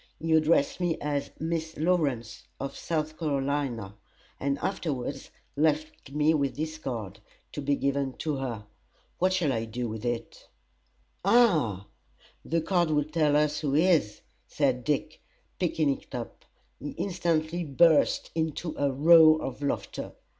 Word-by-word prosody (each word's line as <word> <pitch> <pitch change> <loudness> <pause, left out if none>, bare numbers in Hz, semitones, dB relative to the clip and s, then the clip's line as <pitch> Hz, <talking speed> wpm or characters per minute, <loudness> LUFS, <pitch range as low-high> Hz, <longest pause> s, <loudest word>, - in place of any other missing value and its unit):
He 160 +1 0
addressed 155 -1 +3
me 175 -2 0
as 145 -1 -2
Miss 160 0 -3
Lawrence, 145 -9 -1
of 135 +1 -5
South 155 -1 -3
Carolina, 140 - -1 0.5
and 140 0 0
afterwards 140 -6 -3 0.3
left 155 0 0
me 150 +3 +2 0.2
his 155 +1 -4
card, 110 -8 -5 0.3
to 145 - -5
be 140 0 +1
given 140 -1 -1
to 150 0 -3
her. 120 -6 -4 0.5
What 185 +1 +3
shall 175 -7 +1
I 115 -1 -1
do 120 +2 -4
with 110 -1 -6
it?" 120 -1 -4 0.8
"Ha! 175 - +3 0.6
the 165 +1 0
card 175 0 +1
will 150 -1 +2
tell 155 -1 +1
us 150 0 +2
who 145 -3 -1
he 160 +4 +4
is," 160 - +2 0.3
said 130 -4 0
Dick, 150 +1 -1 0.4
picking 155 -5 +1
it - - -12
up. 120 -2 -7 0.3
He 145 - -6
instantly 175 -2 -1
burst 155 +1 +3
into 160 0 -2
a 140 -1 +2
roar 155 +3 +7
of 135 - -5
laughter. 140 - -3
150 Hz, 140 wpm, -28 LUFS, 135-160 Hz, 0.8 s, roar